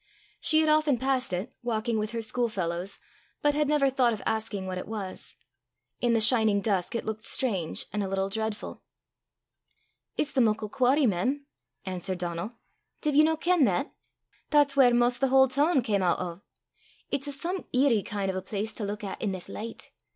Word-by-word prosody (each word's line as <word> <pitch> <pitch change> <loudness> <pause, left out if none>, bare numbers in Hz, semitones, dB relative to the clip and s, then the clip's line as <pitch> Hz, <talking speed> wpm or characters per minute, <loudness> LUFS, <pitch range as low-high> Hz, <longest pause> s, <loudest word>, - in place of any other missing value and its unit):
She 315 0 +5
had 315 - +2
often 305 -3 +3
passed 260 -1 0
it, 190 +9 -3
walking 230 -1 -1
with 215 0 -3
her 230 -1 -2
school 240 +2 0
fellows, 180 -1 -3 0.5
but 295 0 +4
had 300 0 +1
never 295 -2 +3
thought 255 -3 +2
of 215 - -6
asking 220 -3 -2
what 185 -1 -4
it - - -7
was. 200 -3 -6 0.6
In 240 -1 +2
the 230 - +3
shining 220 -2 +4
dusk 200 +1 -1
it 230 - -2
looked 220 0 -4
strange 195 -13 0
and 210 - -1
a - - -2
little 195 0 0
dreadful. 220 +1 -4 1.4
"It's 300 - 0
the 265 - +2
muckle 215 -2 +1
quarry, 270 +4 +3
mem," 250 +8 0 0.4
answered 185 0 -3
Donal: 175 +5 -4 0.5
"div 300 -2 +1
ye 295 - +6
no 320 +1 +3
ken 350 -1 +2
that? 200 - -1 0.6
That's 290 -2 +4
whaur 260 -3 +6
'maist 240 +1 +3
the 270 - +3
haill 265 0 +6
toon 285 +1 +2
cam 205 -4 0
oot 180 -2 +2
o'. 175 0 -5 0.7
It's 280 +1 0
a - - -2
some 340 +7 -3
eerie 255 -4 +3
kin' 195 -1 -2
o' 185 - -4
a - - -2
place 205 +3 -4
to 220 - -5
luik 205 +1 -4
at 195 - -5
i' 220 - -1
this 185 -2 -4
licht. 225 +2 -7
225 Hz, 195 wpm, -27 LUFS, 200-270 Hz, 1.4 s, ye